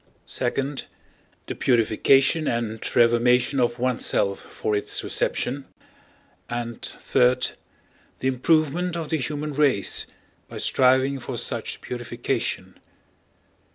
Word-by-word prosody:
(2) 135 +3 -1 0.7
The - - -4
purification 130 +6 +3
and 115 -2 -2 0.2
reformation 120 +3 +4
of 120 -1 +1
oneself 120 -5 +1
for 105 - -3
its 105 - 0
reception, 135 +2 -1 0.8
and 120 0 -4
(3) - - -2 1.0
The 130 - -2
improvement 160 +6 +1
of 160 -3 -4
the 160 - +1
human 150 +2 -3
race 140 -8 +1 0.4
by - - -9
striving 130 +1 +3
for - - -5
such - - -3
purification. 120 -1 -3
130 Hz, 100 wpm, -24 LUFS, 120-140 Hz, 1.0 s, reformation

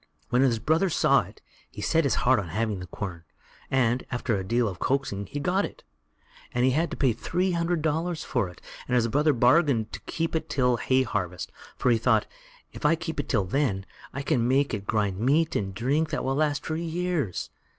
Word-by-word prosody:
When 125 - +3
his 125 -4 +3
brother 160 - +2
saw - - +4
it, - - -13 0.3
he - - -11
set 165 -1 +2
his 140 - +2
heart 130 -2 +5
on 95 - -4
having 105 +3 -1
the 90 - -7
quern, 90 -3 -6 0.5
and, 125 -1 +2
after 120 -2 -1
a 95 - -2
deal 115 +5 +1
of 95 -3 -5
coaxing, 125 -8 -1
he 145 - -5
got 185 +6 +1
it; - - -7 0.7
but 125 - 0
he 130 - +4
had 160 +5 +1
to - - -6
pay 130 -4 +3
three 180 - -1
hundred 170 -1 0
dollars 160 +2 -1
for 120 -8 -1
it, 90 - -14 0.3
and 125 - +1
his 120 -2 +3
brother 145 +6 +3
bargained 125 -2 +3
to - - -5
keep 165 0 -2
it 160 - -2
till 125 -3 +2
hay 130 +2 +2
harvest, 90 - -3 0.3
for 125 - +2
he 115 - +3
thought, - - +3 0.5
if - - -10
I 150 +2 +4
keep 160 -1 -5
it 145 - -3
till 100 -6 +2
then, 100 -3 0 0.3
I 140 - -5
can 120 -3 +1
make 135 +2 +2
it 100 -1 -4
grind 105 -4 0
meat 150 +8 +2
and 95 -2 -1
drink 135 +10 0
that 150 - -2
will 135 - 0
last 150 0 0
for 155 - -2
years. 170 - -2
130 Hz, 215 wpm, -26 LUFS, 110-155 Hz, 0.7 s, heart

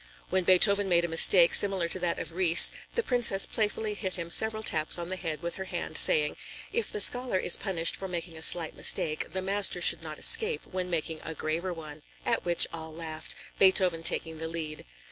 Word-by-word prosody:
When 185 -1 0
Beethoven 200 +2 +4
made 170 -1 +2
a - - -3
mistake 170 +1 +4
similar 195 -4 +3
to 185 - -4
that 175 -1 -2
of - - -6
Ries, 170 -1 +4 0.2
the 470 - -1
Princess 240 - +1
playfully 215 0 -3
hit 190 -2 -6
him 170 -2 -7
several 220 +2 0
taps 155 -5 0
on 170 0 -7
the 185 - -2
head 165 -4 -6
with 170 - -4
her 190 - -6
hand, 175 -2 -6
saying: 150 -1 +2 0.4
"If 465 - -1
the - - -5
scholar 245 0 0
is 180 - +2
punished 175 -5 -2
for 195 - -7
making 170 -2 -6
a 160 - -11
slight 165 -1 +2
mistake, 155 -1 0
the 190 0 -5
master 195 -1 0
should 175 - +5
not 155 -2 -8
escape, 450 0 +4
when 185 -1 -6
making 160 -2 -4
a 160 - -7
graver 165 +5 -4
one," 155 -3 -9 0.2
at - - -1
which 175 -1 +1
all 160 -1 -8
laughed, 160 -1 -7 0.2
Beethoven 185 -3 +3
taking 160 -1 0
the 160 - -5
lead. 160 -2 -7
175 Hz, 205 wpm, -27 LUFS, 165-195 Hz, 0.4 s, should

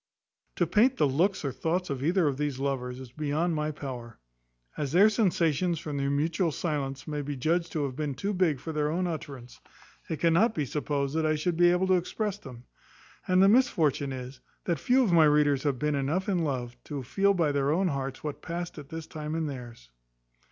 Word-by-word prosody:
To - - +2
paint 245 +5 +3
the 150 - +3
looks 175 +6 +1
or 140 - 0
thoughts 175 +4 -2
of 135 -1 -3
either 170 +1 +2
of 135 -2 -1
these 145 -2 -2
lovers, 130 -2 -3
is 130 -2 -10
beyond 155 +4 -1
my 150 -1 -1
power. 125 -5 -7 0.6
As 145 -1 -3
their 200 +5 +6
sensations, 175 - +1
from 150 -2 -5
their 140 0 0
mutual 160 +4 +1
silence, 145 -3 -3
may 150 -1 -2
be 145 0 -4
judged 165 +5 0
to 155 - 0
have 135 -2 -3
been 145 -2 -3
too 200 +8 -2
big 175 -7 +1
for 160 +5 -6
their 150 -1 0
own 180 +4 0
utterance, 140 -7 -6 0.5
it 160 - -3
cannot 175 +8 +3
be 150 - 0
supposed 140 +1 -2
that 160 -1 +1
I 155 - +2
should 165 +3 -1
be 175 +1 +5
able 180 +2 +2
to 190 - +3
express 205 +3 -3
them: 125 - -11 0.6
and 185 +1 +4
the - - +7
misfortune 160 - +3
is, 130 0 -7 0.2
that 170 -2 -1
few 255 +1 +3
of 210 - +1
my 165 -2 +7
readers 150 -2 +3
have 140 -3 0
been 150 +3 0
enough 145 +8 -1
in 190 -3 +1
love 130 -6 -2
to 145 -3 -5
feel 195 +10 +2
by 165 -5 +2
their 140 -1 +1
own 180 +5 +2
hearts 135 -2 -4
what 150 -2 -5
past 170 -1 -5
at 145 -1 -11
this 160 -1 -6
time 155 -1 -5
in 165 -1 -1
theirs. 120 - -8
150 Hz, 215 wpm, -28 LUFS, 140-175 Hz, 0.6 s, the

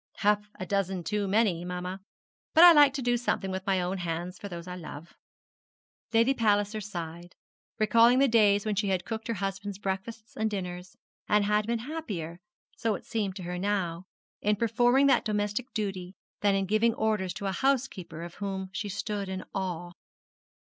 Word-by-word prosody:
'Half 210 0 +1
a 185 - -3
dozen 190 -1 -1
too 205 +2 -1
many, 195 -4 +2
mamma; 180 +1 -5 0.5
but 325 - +9
I 350 - +12
like 295 -3 +7
to 270 - -2
do 245 0 +2
something 195 -5 -1
with 190 +2 -5
my 190 -1 +2
own 180 +2 -2
hands 175 +1 -4
for 200 - -7
those 170 -1 -7
I 180 - -5
love.' 165 -2 -9 1.0
Lady 230 +4 +4
Palliser 210 -2 +1
sighed, 175 -3 -7 0.4
recalling 230 +3 +5
the 275 +1 +5
days 210 -4 +4
when 215 - 0
she 200 +1 0
had 190 -2 0
cooked 225 -1 -5
her 230 - -1
husband's 195 0 -4
breakfasts 205 +3 -5
and 220 0 0
dinners, 180 -3 -6 0.3
and 210 -1 +4
had 210 +1 +1
been 235 0 +1
happier 195 - -5 0.4
so 225 -2 0
it - - -9
seemed 205 -4 -2
to 190 - -7
her 180 +1 -4
now 185 -3 -1 0.4
in 210 +1 +2
performing 240 +5 +3
that 275 - +4
domestic 210 +3 -2
duty 195 -3 -4 0.2
than 200 -1 +3
in 195 0 +1
giving 215 +3 +2
orders 215 -5 0
to 200 - -5
a 195 - 0
housekeeper 190 - -1
of 170 0 -8
whom 190 -1 -3
she 210 +1 -3
stood 205 0 -3
in 190 0 -4
awe. 175 -2 -3
200 Hz, 180 wpm, -28 LUFS, 185-220 Hz, 1.0 s, I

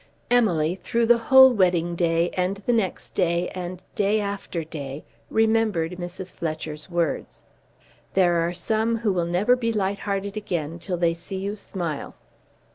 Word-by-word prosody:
Emily, 185 -8 +2
through 235 0 +1
the 235 +1 +5
whole 265 +2 +7
wedding 175 -4 +2
day, 170 0 +1
and 185 +1 -1
the 245 - +2
next 220 -6 -1
day, 175 -1 +1
and 180 0 -6
day 205 +1 +2
after 200 -4 -3
day, 145 -2 -7 0.2
remembered 220 -7 +2
Mrs. 180 +1 -7
Fletcher's 155 -1 -5
words. 170 -3 -2 0.7
"There 175 -2 +4
are 170 +1 +1
some 220 +6 0
who 215 -3 0
will 175 -2 0
never 195 +8 +3
be 230 -2 -1
light 200 -2 -1
hearted 200 0 -3
again 170 -6 -3
till 180 +1 -3
they 170 -1 +2
see 175 +3 -7
you 200 +2 -3
smile." 175 -7 -5
185 Hz, 155 wpm, -24 LUFS, 170-210 Hz, 0.7 s, whole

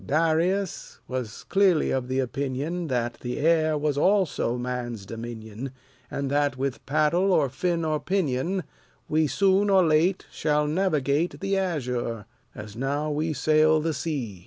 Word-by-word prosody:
Darius 165 +5 0
was 125 -5 -5
clearly 195 -5 +3
of 130 -2 -1
the 130 +1 -2
opinion 140 +6 -2
That 120 -3 -2
the 125 0 -4
air 155 0 +2
is 145 -2 +1
also 185 - +2
man's 120 -4 -4
dominion, 115 +3 -7 0.4
And 140 -1 -3
that, 145 -2 +1
with 135 0 -3
paddle 155 +7 +2
or 150 -6 +3
fin 165 +5 -1
or 155 -1 0
pinion, 180 0 -1 0.4
We 155 0 +2
soon 195 - +3
or 190 -2 +5
late 165 +4 +2
shall 150 -1 +1
navigate 155 -2 0
The 195 0 -1
azure, 125 - -2 0.3
as 105 0 -9
now 140 +5 -1
we 155 +2 -1
sail 155 +2 +3
the 160 +1 -1
sea. 130 - -4
150 Hz, 145 wpm, -26 LUFS, 130-170 Hz, 0.4 s, or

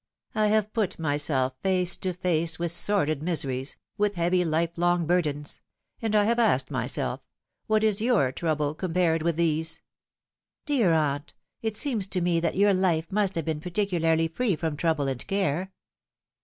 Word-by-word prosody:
I 215 -1 +2
have 215 0 +1
put 215 -6 -1
myself 145 -4 0
face 185 -2 +2
to 185 - -2
face 170 -2 +1
with 170 -1 -1
sordid 170 -5 +1
mise 165 -2 0
ries, 130 +1 -2 0.2
with 205 -1 +1
heavy 175 +1 +2
life 165 0 0
long 175 0 +1
burdens; 150 -4 -1 0.4
and 220 -2 -1
I 210 - +5
have 235 +3 +1
asked 135 - +2
myself, - - -2 0.5
What 215 0 +2
is 215 -1 +3
your 225 - +2
trouble 150 -1 -1
compared 165 -1 0
with 170 0 0
these 160 -1 +1 0.3
?" - - -68
" - - -63
Dear 250 - +2
aunt, 150 -1 0 0.3
it 220 -1 -2
seems 230 -9 0
to 190 - -1
me 175 -1 +2
that 165 -1 -1
your 200 +1 +4
life 175 -3 0
must 200 -1 +1
have 165 -3 -2
been 155 -2 -2
particularly 170 -3 0
free 195 +4 0
from 160 -1 -3
trouble 155 -2 0
and 130 -2 -3
care." 190 -1 -1
170 Hz, 175 wpm, -26 LUFS, 155-200 Hz, 0.5 s, I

